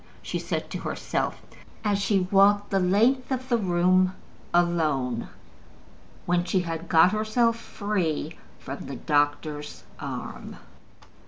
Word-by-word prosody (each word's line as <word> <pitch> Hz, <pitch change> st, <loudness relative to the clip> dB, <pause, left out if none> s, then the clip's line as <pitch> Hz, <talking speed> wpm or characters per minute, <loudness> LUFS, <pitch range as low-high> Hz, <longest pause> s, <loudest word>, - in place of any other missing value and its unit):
she -, -, -3 dB
said -, -, -3 dB
to -, -, -5 dB
herself, -, -, -3 dB, 0.4 s
as 205 Hz, -2 st, +1 dB
she 195 Hz, -2 st, +1 dB
walked 205 Hz, +1 st, +4 dB
the 195 Hz, -, +3 dB
length 230 Hz, +9 st, +2 dB
of 260 Hz, 0 st, -2 dB
the 240 Hz, -, +3 dB
room 185 Hz, 0 st, +3 dB, 0.4 s
alone, 155 Hz, -9 st, +1 dB, 1.0 s
when 175 Hz, 0 st, +2 dB
she 185 Hz, +1 st, +1 dB
had 165 Hz, -1 st, -5 dB
got 165 Hz, +3 st, +6 dB
herself 220 Hz, +2 st, +2 dB
free 190 Hz, -9 st, -2 dB, 0.2 s
from 140 Hz, +1 st, -7 dB
the 140 Hz, -, -5 dB
doctor's 145 Hz, +1 st, -1 dB, 0.2 s
arm. -, -, -6 dB
185 Hz, 120 wpm, -26 LUFS, 160-205 Hz, 1.0 s, got